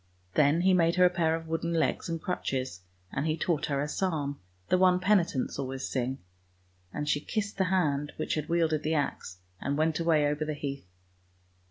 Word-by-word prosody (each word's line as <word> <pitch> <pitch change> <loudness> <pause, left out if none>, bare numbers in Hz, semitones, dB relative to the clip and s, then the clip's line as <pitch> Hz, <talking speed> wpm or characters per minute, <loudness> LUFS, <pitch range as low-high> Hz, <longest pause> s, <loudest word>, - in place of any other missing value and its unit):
Then 150 +3 +4
he 190 +1 +4
made 170 -2 +3
her 180 0 +6
a 180 - +5
pair 165 -3 +1
of 165 0 -6
wooden 165 +1 -1
legs 160 +1 0
and 165 0 -2
crutches, 130 - -3 0.3
and 140 +3 -1
he 155 +1 0
taught 160 -1 0
her 140 -2 0
a 145 - -1
psalm, 150 -4 -2 0.3
the 185 - +3
one 180 -1 +5
penitents 185 -8 +1
always 135 -1 -3
sing; 130 0 -2 0.7
and 150 0 -4
she 145 - +2
kissed 205 +5 -3
the 190 - +3
hand 150 -6 +1
which - - -2
had 155 -1 -3
wielded 165 -3 +2
the 155 +1 0
axe, 140 -10 -2 0.2
and 140 +1 -2
went 160 +1 +1
away 165 -3 +3
over 150 +1 0
the 155 0 -3
heath. 140 -7 -5
155 Hz, 195 wpm, -29 LUFS, 145-170 Hz, 0.7 s, her